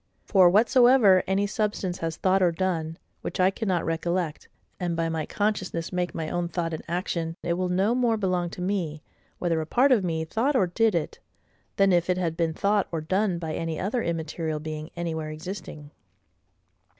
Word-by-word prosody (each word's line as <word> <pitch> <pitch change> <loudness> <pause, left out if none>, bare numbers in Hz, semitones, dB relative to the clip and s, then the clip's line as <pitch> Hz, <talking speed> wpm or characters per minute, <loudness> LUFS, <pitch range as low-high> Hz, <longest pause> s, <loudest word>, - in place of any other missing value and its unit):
For, 185 -4 +6
whatsoever 230 -1 +5
any 195 +2 +1
substance 205 -3 -2
has 165 0 -3
thought 190 0 +2
or 180 -2 +4
done, 165 -2 -2 0.2
which - - -5
I 185 +1 +4
cannot 190 -5 -1
recollect, 165 0 -2 0.3
and 175 -2 -1
by 165 0 0
my 160 -2 -2
consciousness 190 -5 -2
make 180 0 -2
my 160 -1 -3
own 175 +1 -1
thought 170 -1 -3
and 160 - -4
action, 170 -1 -2
it 170 - 0
will 180 +1 -1
no 190 +5 +2
more 240 -3 +2
belong 180 -4 0
to 180 - -8
me, 175 -6 -2 0.3
whether 165 -2 0
a 155 - -5
part 265 - +3
of 225 -6 +4
me 160 -2 -1
thought 240 - 0
or 235 - +4
did 215 +3 +1
it, 165 - -2 0.6
than 195 -1 +4
if 175 0 +2
it 180 - +2
had 170 -3 -1
been 165 -1 -1
thought 205 +1 +1
or 165 - -2
done 185 +4 0
by 160 -2 -4
any 165 -2 -3
other 220 +6 -1
immaterial 160 -2 -3
being 155 0 -6
anywhere 160 -2 -3
existing. 155 -2 -8
175 Hz, 185 wpm, -26 LUFS, 165-195 Hz, 0.6 s, For